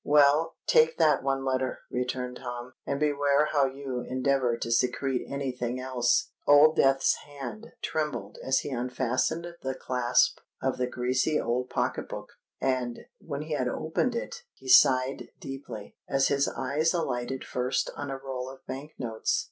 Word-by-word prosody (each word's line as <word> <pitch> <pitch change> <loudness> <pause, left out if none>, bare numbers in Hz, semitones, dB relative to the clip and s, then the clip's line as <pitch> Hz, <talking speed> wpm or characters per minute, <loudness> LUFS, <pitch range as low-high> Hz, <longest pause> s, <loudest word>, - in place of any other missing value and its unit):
"Well—take 150 +2 +4
that 160 -2 +4
one 135 0 -1
letter," 130 -1 -1
returned 125 0 -2
Tom; 125 0 -6
"and 140 - -1
beware 145 0 +2
how 140 -2 +4
you 135 -2 -4
endeavour 130 -1 +1
to 115 - -4
secrete 125 +2 +1
any 140 -1 -2
thing 125 0 -3
else." 130 -2 +1 0.2
Old 145 +2 +7
Death's 135 0 +4
hand 135 -7 -9
trembled 150 -10 -3
as 130 0 +2
he - - -5
unfastened 130 +5 -1 0.2
the 130 0 -3
clasp 125 -1 +2 0.2
of 135 -1 -1
the 125 - +1
greasy 130 +5 +1
old 125 +2 -1
pocket - - -1
book; - - -6 0.3
and, 125 -3 -1 0.2
when 145 -2 -5
he 155 0 -4
had 130 -4 0
opened 160 - -1
it, 470 - -4
he 130 - -14
sighed 130 +1 +5
deeply, 135 -6 -8
as 135 0 +3
his 140 0 +2
eyes 150 +6 0
alighted 130 -5 -2
first 125 +1 -1
on 145 - -5
a 135 - -3
roll 130 -1 -5
of 135 0 -13
Bank 140 +4 -7
notes. 115 -3 -1
130 Hz, 155 wpm, -28 LUFS, 125-145 Hz, 0.3 s, Old